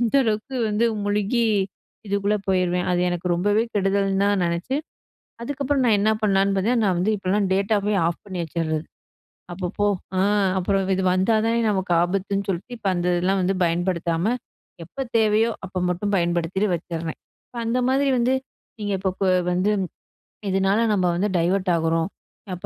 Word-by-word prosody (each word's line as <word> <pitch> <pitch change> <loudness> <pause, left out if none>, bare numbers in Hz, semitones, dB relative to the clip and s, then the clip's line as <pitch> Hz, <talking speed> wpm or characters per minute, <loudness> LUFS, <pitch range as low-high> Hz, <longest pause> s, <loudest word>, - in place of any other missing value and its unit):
அந்த 235 0 0
அளவுக்கு 220 +3 -2
வந்து 210 +2 +1 0.2
முழுகி 210 +3 +1 0.6
இதுக்குள்ள 200 +1 +1
போயிருவேன். 180 -1 +1
அது 175 - +1
எனக்கு 175 0 -3
ரொம்பவே 205 +5 +2
கெடுதல்ன்னு 195 0 +1
தான் 200 -2 +2
நினைச்சு, 170 +10 -2 0.7
அதுக்கப்புறம் 280 +1 -1
நான் 220 -3 +4
என்ன 210 +2 +2
பண்ணலாம்ன்னு 195 -1 +2
பார்த்தேன்னா, 230 +5 +2
நான் 185 -3 +1
வந்து 210 +5 +1
இப்போலாம் 195 +1 0
டேட்டாவே 205 +1 +1
ஆஃப் 170 - -3
பண்ணி 190 -3 -5
வச்சறது. 160 -1 -2 0.7
அப்பப்போ, 185 +3 -2 0.3
அ - - +2 0.4
அப்புறம் 195 +1 0
இது 190 - -1
வந்தா 190 +5 +2
தானே 230 +1 +2
நமக்கு 190 -3 -1
ஆபத்துன்னு 195 +2 -1
சொல்லிட்டு, 195 +7 -3
இப்ப 205 - -4
அந்த 175 0 -2
இதெல்லாம் 190 +2 +1
வந்து 190 +2 +1
பயன்படுத்தாம, 170 +4 0 0.5
எப்ப 170 - -27 0.2
தேவையோ, 220 +1 +3 0.2
அப்ப 185 -1 -4
மட்டும் 200 +4 -2
பயன்படுத்திட்டு 175 +3 0
வச்சறேன். 165 -1 -5 0.3
இப்ப 245 - -12
அந்த 235 +2 0
மாரி 275 +1 +2
வந்து, 250 +2 +2 0.4
நீங்க 205 -1 -2
இப்ப 190 -1 -1
ப - - +3 0.3
வந்து 185 +4 +1 0.8
இதனால 195 +2 +2
நம்ம 185 -3 +1
வந்து 205 +4 +1
டைவர்ட் 185 +2 +1
ஆகுறோம். 165 +1 0 0.4
அப்ப 180 - -7
195 Hz, 155 wpm, -23 LUFS, 180-210 Hz, 0.8 s, நான்